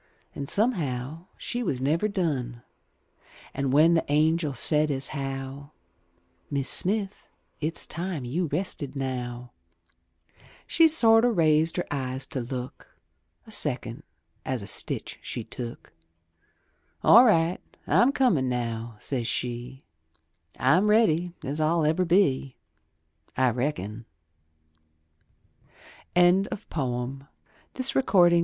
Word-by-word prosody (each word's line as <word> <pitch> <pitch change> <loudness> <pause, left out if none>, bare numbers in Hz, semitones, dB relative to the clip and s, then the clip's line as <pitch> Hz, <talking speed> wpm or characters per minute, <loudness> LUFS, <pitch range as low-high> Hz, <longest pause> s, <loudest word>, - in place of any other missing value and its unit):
An' 140 - -6
somehow 160 - -1
she 245 - -4
was 145 - -2
never 155 +10 +1
done; 135 - -3 0.9
An' 135 -1 -2
when 155 +5 +5
the 165 - +2
angel 155 0 +1
said, 150 +4 +2
as 135 -2 0
how 135 0 -6 0.4
" 85 0 -41
Mis' 140 -2 0
Smith, 200 +1 +1 0.3
it's 155 +2 -1
time 170 -5 -4
you 165 +8 -1
rested 145 -5 -3
now," 125 -2 -4 1.1
She 330 - +5
sorter 235 -6 +5
raised 160 -3 +2
her 175 - -1
eyes 130 -2 -2
to 135 - -2
look 125 +1 -8 0.5
A 220 - -14
second, 140 - -2 0.4
as 130 -5 -3
a^ - - -9
stitch - - -4
she 120 - -5
took; 115 +1 -8 1.1
All 235 - +8
right, 175 -7 +2 0.2
I'm 250 +3 +4
comin' 210 - +2
now," 115 -2 -3
says 120 +1 -3
she, 125 +2 -4 0.8
I'm 170 +11 +3
ready 180 -6 +3
as 145 +4 -3
I'll 160 +1 +2
ever 160 +4 +1
be, 145 -7 +2 0.8
I 130 -1 +3
reckon," 120 -4 -3 2.1
Albert 180 +3 +3
Bigelow 135 -1 -3 0.2
Paine. 265 0 -2
145 Hz, 110 wpm, -26 LUFS, 125-175 Hz, 2.1 s, All